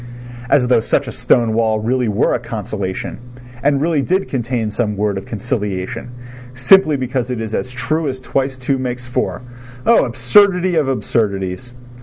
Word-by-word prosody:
As 125 -3 +4
though 125 - +4
such - - 0
a - - -4
stone 115 -2 +2
wall 110 -1 +1
really 125 +3 0
were 105 +2 +1
a - - 0
consolation, 105 -5 -5 0.4
and 140 0 +2
really 155 -1 +1
did 185 +6 0
contain 120 -4 -2
some 105 -2 -2
word 105 -1 0
of 95 - -6
conciliation, 110 0 -3 0.5
simply 150 +4 +5
because 130 -1 -2
it 125 -2 -3
is 110 -1 -5
as 125 - -2
true 135 +5 -2
as 130 -1 -3
twice 135 0 -2
two 130 +1 -1
makes 125 -1 -4
four. 125 0 -2 0.4
Oh, 235 - +5
absurdity 180 - +3
of 155 -4 +2
absurdities! 110 -2 -2
125 Hz, 165 wpm, -18 LUFS, 110-135 Hz, 0.5 s, simply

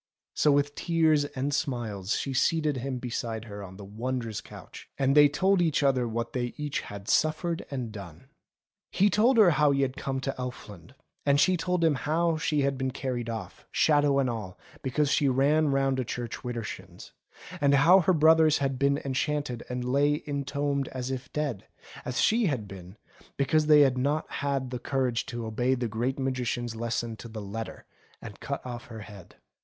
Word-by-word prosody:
So 150 - +3
with 145 0 +2
tears 160 -2 +2
and 140 0 -3
smiles 115 -10 -2
she 135 - -3
seated 150 +2 +1
him 130 +1 -3
beside 115 -2 -4
her 100 -2 -8
on 95 -1 -10
the 100 - -9
wondrous 115 +1 -4
couch, - - -12
and 135 0 +2
they 145 -1 +8
told 190 +5 +2
each 160 -4 +1
other 130 -3 +2
what 115 +1 -3
they 120 -1 -3
each 150 -1 -2
had 100 0 -9
suffered 160 +4 0
and 125 -5 -4
done. 100 -7 -10 0.6
He 200 +2 +2
told 230 +6 +4
her 205 -6 +7
how 150 -1 +3
he 140 -1 +2
had 130 0 -2
come 135 -1 -3
to 135 0 -2
Elfland, 120 -4 -8 0.3
and 140 0 +3
she 185 +4 +4
told 180 0 -1
him 160 -2 +4
how 160 +4 0
she 150 -1 0
had 135 -1 0
been 130 0 0
carried 125 -3 -4
off, 110 -5 -7
shadow 145 -2 +3
and 135 -2 +2
all, 110 -6 -5 0.2
because 140 +2 0
she 145 - +3
ran 145 +4 +3
round 135 -1 +1
a - - 0
church 120 0 -5
widershins, 105 -7 -7 0.5
and 140 -1 +4
how 165 +7 +7
her 185 +1 +3
brothers 160 -1 +5
had 135 -2 -1
been 140 +1 +2
enchanted, 135 -2 -1
and 125 0 -3
lay 145 +3 +2
intombed 140 -1 -2
as 130 0 -5
if 130 -1 -6
dead, 145 -9 -3 0.4
as 125 - -2
she 225 -1 +3
had 125 -9 -2
been, 95 +1 -11 0.4
because 150 +2 +2
they 150 -1 +7
had 130 -3 +3
not 145 +4 0
had 140 -2 -2
the 125 - -4
courage 130 -4 -1
to 120 -1 -5
obey 120 +4 0
the 120 -1 -2
Great 120 +5 -2
Magician's 125 -3 -2
lesson 115 0 -3
to 115 - -9
the 110 -1 -7
letter, 110 +3 -6 0.3
and - - -10
cut - - -5
off 120 -1 -6
her 110 -2 -9
head. 100 -4 -12
135 Hz, 190 wpm, -28 LUFS, 120-145 Hz, 0.6 s, they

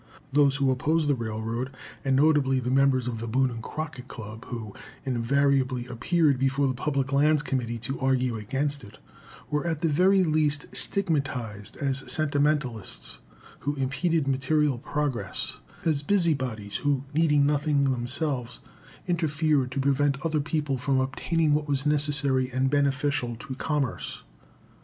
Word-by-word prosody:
Those 140 -1 +4
who 140 -2 +2
opposed 150 +4 +1
the 145 - +4
railroad, 115 +1 -3 0.3
and 135 -1 +2
notably 140 -2 +3
the 125 0 -2
members 135 -2 +3
of 115 -2 -3
the 115 - -5
Boone 130 +3 +2
and 115 -1 -6
Crockett 150 -1 -6
Club, 110 0 -9
who 110 -4 -6 0.3
invariably 130 0 +1
appeared 140 +3 +1
before 135 +1 +2
the 130 - 0
Public 135 0 -1
Lands 150 +1 +3
Committee 120 -4 -2
to 125 +4 -3
argue 130 -2 +1
against 135 +6 -2
it, 105 0 -13 0.5
were 150 +3 0
at 160 -3 -2
the 165 - +2
very 185 +5 +4
least 150 -3 +1
stigmatized 135 - -2
as 135 -2 -1
"sentimentalists," 145 -5 -1 0.4
who 145 +1 -2
impeded 145 +3 0
material 135 0 +1
progress 130 -9 -2 0.3
as 155 -4 +1
busybodies, 135 - 0
who, 140 -2 0
needing 150 -2 +3
nothing 145 0 +2
themselves, 130 0 -1 0.5
interfered 155 -5 +1
to 135 +2 -3
prevent 140 +1 +2
other 155 -2 +1
people 145 -3 -1
from 135 +1 +1
obtaining 150 +4 +1
what 150 0 0
was 140 -1 -1
necessary 145 -3 +3
and 130 +1 0
beneficial 140 -3 +1
to 135 +4 -7
commerce. 140 -1 -2
140 Hz, 145 wpm, -27 LUFS, 125-150 Hz, 0.5 s, Those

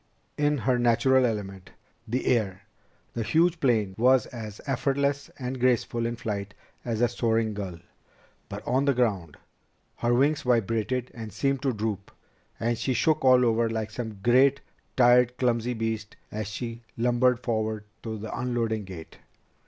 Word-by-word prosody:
In 150 0 +1
her 125 +1 +1
natural 125 +2 +4
element, 95 -4 -5 0.4
the 125 +4 -2
air, 105 -6 0 0.5
the 115 - -3
huge 170 +8 +2
plane 110 - +1
was 130 +2 +5
as 110 -4 -8
effortless 140 +1 0
and 130 0 -4
graceful 120 -1 +1
in 120 - -3
flight 105 -3 -4 0.3
as 115 -2 -2
a 120 - +5
soaring 115 -2 0
gull. 95 -4 -5 0.7
But - - -7
on 130 +2 +2
the 140 -2 +2
ground, 100 -11 0 0.6
her 120 - 0
wings 140 +5 +3
vibrated 120 +1 0
and 110 -2 -7
seemed 135 +2 0
to 135 - +1
droop, 105 -3 -3 0.5
and 115 0 -1
she 130 - 0
shook 155 +5 +2
all 130 -1 +6
over 115 0 +2
like 110 -1 -3
some 110 -3 -5
great, 130 +4 +4 0.4
tired 125 0 +5
clumsy 120 -1 0
beast 110 -2 -3 0.2
as 105 -1 -4
she 115 +2 -5 0.2
lumbered 120 +1 +3
forward 110 -3 -2 0.2
to 110 -1 -5
the 110 +1 -6
unloading 115 -4 -1
gate. 90 -4 -10
120 Hz, 150 wpm, -27 LUFS, 110-125 Hz, 0.7 s, all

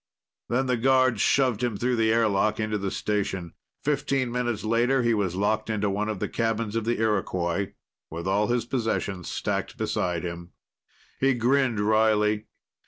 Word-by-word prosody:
Then 130 +3 +1
the 125 -1 +1
guards 130 -2 +3
shoved 125 -5 +2
him 120 -4 -1
through 125 +3 0
the 110 -1 +3
airlock 110 -2 +2
into 110 -1 -1
the 100 0 -2
station. 95 -5 -2 0.3
Fifteen 135 -3 0
minutes 120 -4 -2
later 120 +4 +2
he 120 -1 +3
was 100 -5 0
locked 110 +3 0
into 105 -2 0
one 105 +2 -1
of 110 - -2
the - - -2
cabins 115 -2 -1
of 115 -1 -1
the 120 0 0
Iroquois, 95 -4 0 0.4
with 85 +3 -5
all 100 +2 +2
his 120 -1 0
possessions 110 -7 -2
stacked - - -3
beside 90 -2 -1
him. 85 0 -7 0.7
He 135 -1 +3
grinned 125 -1 +2
wryly. 105 0 +2
110 Hz, 165 wpm, -26 LUFS, 100-120 Hz, 0.7 s, guards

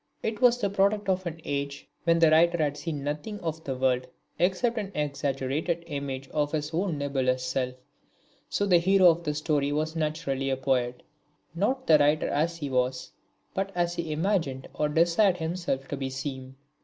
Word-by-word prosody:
It 220 +1 -2
was 245 -1 +6
the 200 -4 0
product 200 +1 +2
of 185 -1 0
an 165 -1 -5
age 140 0 -3 0.2
when 165 -1 +4
the 165 -2 +5
writer 170 +2 +5
had 150 -3 0
seen 150 -1 -4
practically 150 +8 -3
nothing 205 -4 -8
of 160 0 -3
the 135 -3 -3
world 130 -1 +1 0.3
except 205 +6 +1
an 200 -2 -5
exaggerated 145 +3 -1
image 140 -3 -4
of 150 -1 -1
his 150 0 -2
own 175 -1 0
nebulous 130 -3 0
self. 125 0 -2 0.7
So 200 - 0
the 180 -3 +5
hero 185 0 +6
of 170 +1 -4
the 150 -2 -2
story 150 -2 0
was 155 +2 -1
naturally 150 -4 -1
a 135 - 0
poet, 125 -2 0 0.5
not 255 +10 0
the 155 -2 +6
writer 145 +1 +3
as 165 +4 0
he 145 -3 -4
was, 125 -1 -1 0.4
but 195 +1 -2
as 175 -1 +1
he 170 -2 -4
imagined 155 -5 -1
or 150 - 0
desired 175 +5 +3
himself 160 -5 -2
to 135 -2 -3
seem. 130 -1 -6
155 Hz, 180 wpm, -27 LUFS, 140-175 Hz, 0.7 s, was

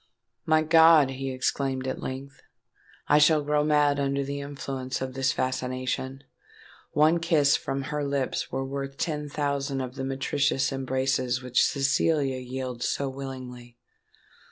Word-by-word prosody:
"My 155 0 +4
God!" 160 -3 +6
he 135 0 -4
exclaimed, 130 0 -1
at 130 - -3
length, 135 +1 -7 0.7
"I 150 - +5
shall 150 0 +5
grow 150 0 +1
mad 150 -1 +3
under 140 0 0
the 140 +1 -4
influence 135 -2 -5
of 130 -1 -4
this 135 0 +1
fascination! 130 +1 -3 0.7
One 155 +3 +4
kiss 155 -4 +3
from 135 0 -3
her 150 +2 -3
lips 140 -2 -2
were 135 0 -2
worth 135 0 -5
ten 150 -3 -2
thousand 140 -2 -2
of 130 -1 -4
the 135 0 -5
meretricious 135 +1 0
embraces 130 -1 -1
which 125 0 +2
Cecilia 140 0 +1
yields 125 -1 -4
so 140 -1 -1
willingly. 130 -3 -8
135 Hz, 140 wpm, -26 LUFS, 130-145 Hz, 0.7 s, God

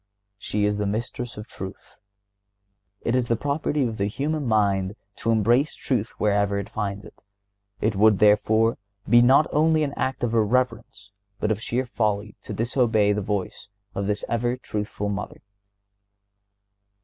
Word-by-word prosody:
She 105 +1 -1
is 105 0 +1
the 105 - 0
Mistress 115 +3 -4
of 105 - -7
truth. 95 0 -9 1.1
It 115 - -1
is 125 -2 +1
the 115 - +2
property 145 +2 -1
of 115 -2 -3
the 100 - 0
human 145 +5 -2
mind 100 -3 +1 0.2
to 115 - -2
embrace 120 +6 +3
truth 120 -4 -1
wherever 100 -1 +2
it 100 - -4
finds 100 0 -3
it. 105 - -15 0.6
It 105 0 +1
would, 105 +1 +5
therefore, 110 +2 +3 0.3
be 120 +2 +6
not 135 +5 +6
only 155 +1 +3
an 140 -1 -2
act 130 -1 -2
of 120 -1 0
irreverence, 115 -2 0 0.3
but 105 - 0
of 110 0 -1
sheer 125 +3 -1
folly, 105 -3 -1
to - - -8
disobey 115 -3 +2
the 105 - -1
voice 100 0 -3 0.3
of 100 0 -2
this 105 0 -1
ever 120 +2 0
truthful 105 -3 -4
Mother. 100 - -5
110 Hz, 155 wpm, -24 LUFS, 105-120 Hz, 1.1 s, be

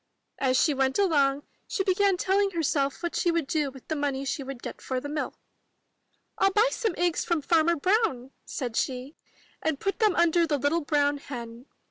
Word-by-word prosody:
As 260 -1 +2
she 300 - +3
went 265 -1 +1
along, 290 -8 +2 0.2
she 435 -5 -1
began 385 0 +2
telling 395 +2 +2
herself 300 -5 -1
what 345 - -2
she 345 - +1
would 335 -3 +1
do 300 -1 0
with 265 -1 -14
the 315 - -2
money 280 -2 -2
she 280 +2 -2
would 270 -2 -7
get - - -7
for 260 -1 -2
the 285 - -6
milk. 295 +1 -3 1.1
'TU 390 - +6
buy 430 +3 +5
some 445 -9 -1
eggs 350 -1 +1
from 335 -4 -1
Farmer 335 +1 +3
Brown,'* 300 - +1
said 245 -5 -5
she, 260 +4 -2 0.5
'*and 315 -3 -1
put 395 +3 -2
them 425 -5 +3
under 340 0 +3
the 295 -2 +1
little 285 +5 +1
brown 290 -1 +1
hen. 240 -2 -8
300 Hz, 190 wpm, -27 LUFS, 275-350 Hz, 1.1 s, TU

